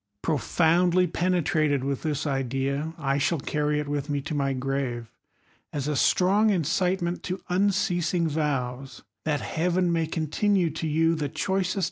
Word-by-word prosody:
' 100 - -51
Profoundly 175 +3 +2
penetrated 160 -5 +1
with 140 -1 -2
this 150 -2 -2
idea, 135 +3 -2
I 140 0 0
shall 145 +3 +1
carry 150 +1 0
it 150 - -2
I - - -8
with 145 0 -2
me 145 -1 0
to 150 +3 -5
my 140 -2 0
grave, 130 -3 -3 0.6
as 145 -1 -3
a 150 - 0
strong 195 +9 +3
incitement 180 0 0
to 185 +1 -4
unceas 180 -3 +1
I 175 - +2
in^ 165 - +2
vows 135 -4 -3 0.2
that 150 -2 0
Heaven 175 +1 0
may 165 -1 0
continue 170 +3 +1
to 160 +1 -4
you 165 +2 +2
the 150 -3 -2
choicest 185 +5 -1
155 Hz, 165 wpm, -26 LUFS, 140-175 Hz, 0.6 s, strong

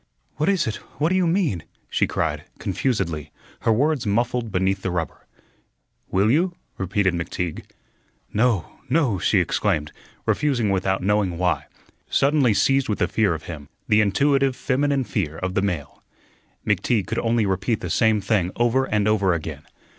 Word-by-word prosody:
"What 155 +5 +1
is 195 -4 +2
it? 110 - -2 0.2
What 155 +3 +2
do 185 - +1
you 185 -2 +3
mean?" 165 - +1 0.3
she - - +1
cried, - - -2
confusedly, 85 - -2 0.3
her 115 - +1
words 135 +1 +1
muffled 120 +2 0
beneath 95 +1 0
the 95 - -2
rubber. 85 -4 -4 0.8
"Will 100 +4 +3
you?" 175 +5 +2 0.2
repeated 95 0 +1
McTeague. 85 -1 -3 0.7
"No, 110 -6 0
no," 130 - +2
she - - +2
exclaimed, 75 0 0 0.3
refusing 125 -8 +1
without 95 0 0
knowing 100 -3 +1
why, 90 0 0 0.4
suddenly 140 -6 +3
seized 135 +4 +2
with 105 - -1
a - - +2
fear 105 -6 +1
of 80 - -8
him, 75 -3 -8 0.2
the 105 0 +5
intuitive 135 +5 +2
feminine 140 +1 +1
fear 80 -10 -2
of 90 0 -3
the 95 - +1
male. 90 -8 -3 0.6
McTeague 105 +1 +1
could - - -2
only 115 -1 +1
repeat 95 +3 0
the 90 - -4
same 110 +1 +3
thing 95 -3 +1
over 120 +3 +2
and 105 -4 +1
over 100 -4 +3
again. 80 - -6
105 Hz, 160 wpm, -23 LUFS, 95-130 Hz, 0.8 s, the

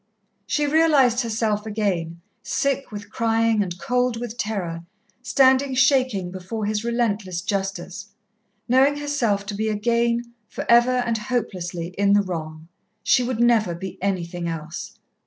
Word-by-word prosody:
She 295 - +1
realized 285 -5 +4
herself 220 -2 -1
again, 180 -6 -2 0.2
sick 275 -2 -1
with 205 0 -8
crying 225 -1 +2
and 180 -3 -3
cold 250 +3 0
with 240 -1 -5
terror, 185 -8 -3 0.4
standing 265 +1 +3
shaking 255 -8 +2
before 190 +4 -5
his 210 +1 -1
relentless 215 -7 -1
justice, 195 0 -3 0.6
knowing 270 +4 +4
herself 240 -9 0
to 205 - -5
be 220 +2 -1
again, 235 +2 0
for - - -6
ever 240 +2 +5
and 230 -1 0
hopelessly, 180 -7 -3
in 200 0 +4
the 205 0 +4
wrong. 160 -3 -6 0.4
She 250 - +4
would 245 -1 -2
never 230 -7 +3
be 190 +2 -7
anything 175 -3 -2
else. 165 0 -6
215 Hz, 140 wpm, -23 LUFS, 190-245 Hz, 0.6 s, ever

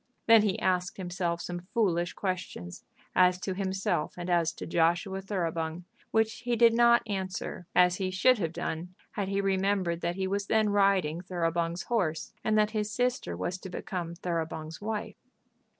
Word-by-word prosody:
Then 225 -1 +8
he 205 -3 +1
asked 180 -1 0
himself 175 -2 -2
some 175 0 -6
foolish 175 -6 +1
questions 130 - -4 0.3
as 180 0 +5
to 190 - -2
himself 190 -4 -1
and 175 0 -3
as 170 -2 +3
to - - -7
Joshua 175 +4 +1
Thoroughbung, 170 -3 -2 0.3
which 220 +1 +1
he 245 0 -1
did 230 0 +6
not 235 0 +5
answer 190 -3 -4
as 180 0 +5
he 190 -2 -1
should 215 +6 +4
have 165 -4 -1
done, 175 +2 -4 0.2
had 200 -2 -2
he 200 +1 0
remembered 190 -3 +1
that 170 +1 -1
he 190 0 -1
was 200 +1 -1
then 220 -1 +3
riding 195 -5 +2
Thoroughbung's 170 -1 -1
horse, 175 -10 -1
and 215 0 +2
that 210 0 +3
his 215 -1 -2
sister 245 - -1
was 180 - -3
to 190 - -8
become 175 -2 -4
Thoroughbung's 165 -2 -4
wife. 215 0 -4
185 Hz, 165 wpm, -29 LUFS, 170-205 Hz, 0.3 s, Then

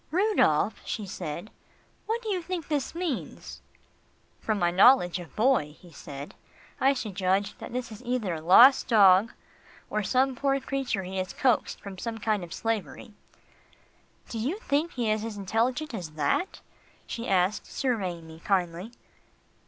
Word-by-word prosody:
"Rudolph," 400 +6 +2
she 215 - -4
said, 175 +1 -6 0.6
"what 460 +2 -2
do 440 - -4
you 375 -3 0
think 340 -2 -5
this 295 0 -2
means?" 340 -7 -5 0.8
"From 215 -1 -1
my 175 -2 +1
knowledge 185 -2 +5
of 175 -3 -11
Boy," 215 - +2
he 175 - -16
said, 140 -2 -9 0.5
"I 270 +1 +4
should 220 -6 -5
judge 195 +2 0
that - - -8
this 250 -1 -4
is 215 - -10
either 240 -7 -1
a 160 - -5
lost 235 - +7
dog, 200 -1 +6 0.6
or 215 - 0
some 255 +6 +1
poor 275 +1 +1
creature 265 -7 -2
he 190 +1 -6
has 185 0 -3
coaxed 250 -4 +1
from 195 -2 -9
some 230 +1 -4
kind 215 -3 -1
of 170 - -9
slavery." 225 - -4 1.1
"Do 230 - -5
you 280 - -1
think 315 -3 -1
he 235 -4 0
is 215 0 -1
as 225 -2 -5
intelligent 240 +9 -1
as 180 -7 -5
that?" 155 - -1 0.4
she 235 +1 -5
asked 190 +2 +1
surveying 190 -10 -2
me 160 0 -12
kindly. 180 +3 -1
220 Hz, 160 wpm, -27 LUFS, 185-265 Hz, 1.1 s, lost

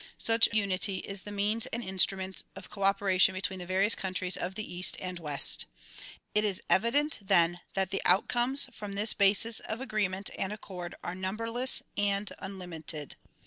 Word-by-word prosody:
Such 225 0 +4
unity 200 -2 +1
is 195 +1 -5
tlie 205 - -7
means 210 +3 0
and 235 +1 -4
instrument 190 0 0
of 195 -1 -11
cooperation 195 -2 +3
between 185 0 -3
the 180 - -7
various 195 +4 +4
countries 185 -1 -1
of 185 +2 -4
the 215 - -4
east 180 +1 +1
and 180 -1 -5
west. 150 - +1 0.7
It 210 - +3
is 200 -3 +1
evident 285 +9 +3
then 175 -2 +3 0.2
that 190 0 0
the 195 - -1
outcomes 240 +8 +3
from 205 -2 -7
this 210 +2 +2
basis 205 +3 +2
of 220 - -5
agreement 205 -6 -1
and 195 - -1
accord 180 -4 -7
are 175 - -3
number 195 +5 -4
less 250 +2 +3
and 200 0 +1
unlimited. 170 -6 -6
195 Hz, 165 wpm, -30 LUFS, 185-215 Hz, 0.7 s, Such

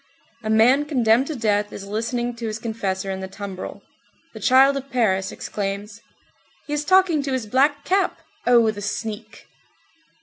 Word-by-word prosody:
A 215 - -4
man 245 +7 +4
condemned 250 -3 +2
to 315 - -4
death 210 -3 0
is 195 - -8
listening 235 +4 -2
to 230 -1 -4
his 215 0 -3
confessor 200 -4 -3
in 190 - -4
the 190 - -5
tumbrel. 195 -1 -7 0.5
The - - -9
child 270 +2 +5
of 275 0 -5
Paris 200 -7 +1
exclaims: 205 +1 -5 0.6
"He 295 - -5
is 295 0 -1
talking 370 -2 +4
to 275 -1 -3
his 255 -4 -2
black 285 +6 +2
cap! 385 +1 +1 0.3
Oh, 235 -3 +5
the 205 -1 -8
sneak!" 210 +1 -5
230 Hz, 165 wpm, -22 LUFS, 205-270 Hz, 0.6 s, child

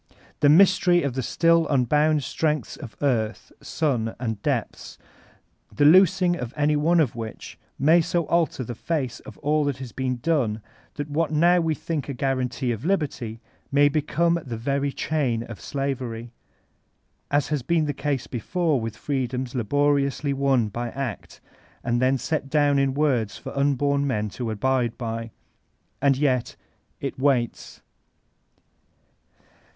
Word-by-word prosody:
The 145 - +5
Mystery 180 +1 +5
of 140 -3 -1
the 130 - -2
still 165 +5 +2
unbound 150 +3 +2
strengths 155 +2 -1
of 120 -8 -10
earth, 115 -6 -1
sun, 125 -8 -1
and 110 -5 -3
depths, - - -3 0.7
the 145 - +2
loosing 180 +2 +5
of 125 -5 -6
any 150 +1 +2
one 165 +4 +3
of 140 -9 +1
which 115 -2 -8 0.2
may 160 +5 +5
so 170 +1 -1
alter 165 -5 0
the 120 - -5
face 135 0 -3
of - - -12
all 150 +1 +2
that 140 -2 -1
has 130 -3 -8
been 130 -1 -2
done 120 -8 0 0.3
that 145 0 -4
what 160 +2 +1
now 170 +4 +4
we 160 -1 0
think 155 -2 -4
a 140 - -3
guarantee 130 -1 -1
of 115 -1 -4
liberty 140 - -2 0.3
may 145 +1 +5
become 170 +3 +1
the 120 -3 -5
very 140 +4 -1
chain 135 -7 -1
of 115 -3 -10
slavery, 125 -4 -4 1.0
as 145 0 +1
has 150 -2 0
been 165 +3 +1
the 145 - -1
case 140 -2 -2
before 150 - -1
mth 110 -1 -4
freedoms 130 -1 -3
laboriously 140 +3 +1
won 135 -4 +2
by 120 +3 -4
act, 130 -5 -6 0.4
and 120 0 0
then 130 +1 +3
set 140 0 -3
down 145 -1 +3
in 135 -1 +1
words 125 -9 +1
for - - -8
unborn 140 0 +1
men 105 -5 -1
to 120 +3 -5
abide 120 +2 0
by. 115 -1 -4 0.7
And 140 -1 +3
yet 130 -4 0 0.2
— - - -43
^It - - -4
waits. 130 -4 -1
140 Hz, 150 wpm, -24 LUFS, 120-150 Hz, 1.0 s, The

